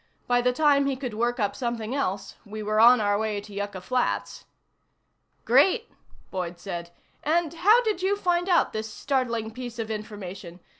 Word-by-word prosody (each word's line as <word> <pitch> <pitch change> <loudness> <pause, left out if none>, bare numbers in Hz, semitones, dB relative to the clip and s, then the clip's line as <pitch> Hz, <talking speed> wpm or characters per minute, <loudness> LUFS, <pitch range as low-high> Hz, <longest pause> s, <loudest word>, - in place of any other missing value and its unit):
By 245 0 +2
the 250 +1 +2
time 280 +1 +3
he 275 - 0
could 255 -3 -5
work 240 +3 -1
up 205 -2 0
something 235 -2 -3
else, 195 -8 -2
we 215 0 -7
were 215 +1 0
on 240 +2 +8
our 205 -1 +1
way 215 -2 -1
to 205 0 -12
Yucca 200 -2 -4
Flats." 100 - -2 1.0
"Great," 270 +10 +4 0.4
Boyd 180 -2 -4
said. 175 -3 -6 0.3
"And 330 +1 +1
how 420 +9 +5
did 425 -5 -1
you 385 +2 +2
find 355 -1 0
out 350 - +3
this 220 0 -4
startling 235 -4 -1
piece 245 0 -7
of 225 -1 -4
information? 195 -4 -7
230 Hz, 170 wpm, -26 LUFS, 205-275 Hz, 1.0 s, on